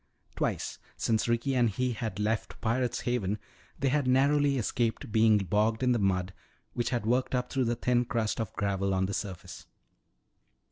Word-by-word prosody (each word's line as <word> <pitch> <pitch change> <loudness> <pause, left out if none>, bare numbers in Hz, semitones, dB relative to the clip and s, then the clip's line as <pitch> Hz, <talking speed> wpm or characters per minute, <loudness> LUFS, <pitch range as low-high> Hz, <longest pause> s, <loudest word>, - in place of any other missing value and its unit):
Twice - - -2 0.2
since 110 0 +1
Ricky 120 +3 +1
and 120 -3 +3
he 125 +5 -1
had 110 -2 -4
left 105 +1 -1
Pirate's 120 +2 0
Haven 110 -5 -1 0.4
they 140 - +1
had 140 0 +1
narrowly 140 +2 +3
escaped 115 -1 -1
being 110 0 +5
bogged 105 +4 +1
in 125 - +3
the 120 - +2
mud 95 -2 0 0.4
which 120 - -1
had 120 -4 -1
worked 125 +3 +1
up 125 0 -2
through 130 -2 +1
the 120 +1 0
thin 120 +1 +1
crust 115 -2 -1
of 110 - -4
gravel 100 -1 0
on 95 0 +1
the 100 - -3
surface. 95 -2 -6
115 Hz, 175 wpm, -29 LUFS, 105-125 Hz, 0.4 s, being